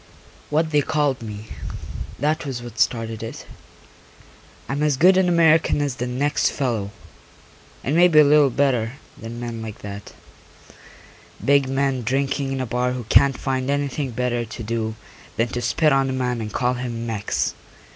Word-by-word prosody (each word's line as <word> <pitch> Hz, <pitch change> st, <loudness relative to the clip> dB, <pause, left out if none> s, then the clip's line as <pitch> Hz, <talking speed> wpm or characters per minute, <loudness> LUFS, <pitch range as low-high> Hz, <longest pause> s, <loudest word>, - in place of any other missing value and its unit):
What 155 Hz, +2 st, +1 dB
they 150 Hz, -1 st, +4 dB
called 145 Hz, -3 st, 0 dB
me, 105 Hz, -1 st, -8 dB, 0.7 s
that 155 Hz, +2 st, 0 dB
was 130 Hz, -5 st, -5 dB
what 115 Hz, -2 st, -9 dB
started 115 Hz, -1 st, 0 dB
it. 115 Hz, -, -7 dB, 1.2 s
I'm 135 Hz, +4 st, -2 dB
as 150 Hz, -3 st, +2 dB
good 185 Hz, +6 st, +6 dB
an 185 Hz, -1 st, +3 dB
American 165 Hz, -3 st, +4 dB
as 140 Hz, -4 st, -1 dB
the 125 Hz, -, -2 dB
next 140 Hz, +4 st, +1 dB
fellow, 115 Hz, -8 st, -2 dB, 0.9 s
and 140 Hz, -, 0 dB
maybe 175 Hz, -2 st, +5 dB
a 150 Hz, -, +10 dB
little 145 Hz, -1 st, +5 dB
bit 120 Hz, -, -11 dB
better 125 Hz, -5 st, +2 dB, 0.2 s
than 115 Hz, +1 st, -8 dB
men 120 Hz, -2 st, -5 dB
like 110 Hz, -2 st, -7 dB
that, 100 Hz, 0 st, -8 dB, 1.3 s
big 140 Hz, -1 st, +4 dB
men 135 Hz, -1 st, 0 dB
drinking 135 Hz, +3 st, -1 dB
in 135 Hz, -, -2 dB
a -, -, -1 dB
bar 125 Hz, +2 st, 0 dB
who 125 Hz, -1 st, -4 dB
can't 140 Hz, -2 st, +5 dB
find 130 Hz, -1 st, -2 dB
anything 140 Hz, -1 st, -1 dB
better 120 Hz, 0 st, -1 dB
to 115 Hz, 0 st, -8 dB
do 110 Hz, 0 st, -2 dB, 0.4 s
than 115 Hz, +1 st, +1 dB
to 120 Hz, -, -3 dB
spit 135 Hz, +6 st, +2 dB
on 135 Hz, 0 st, +2 dB
a -, -, -2 dB
man 125 Hz, -2 st, -1 dB
and 105 Hz, -1 st, -5 dB
call 125 Hz, +3 st, +1 dB
him 120 Hz, -2 st, -4 dB
Mex. 110 Hz, -3 st, -1 dB
130 Hz, 170 wpm, -22 LUFS, 115-145 Hz, 1.3 s, a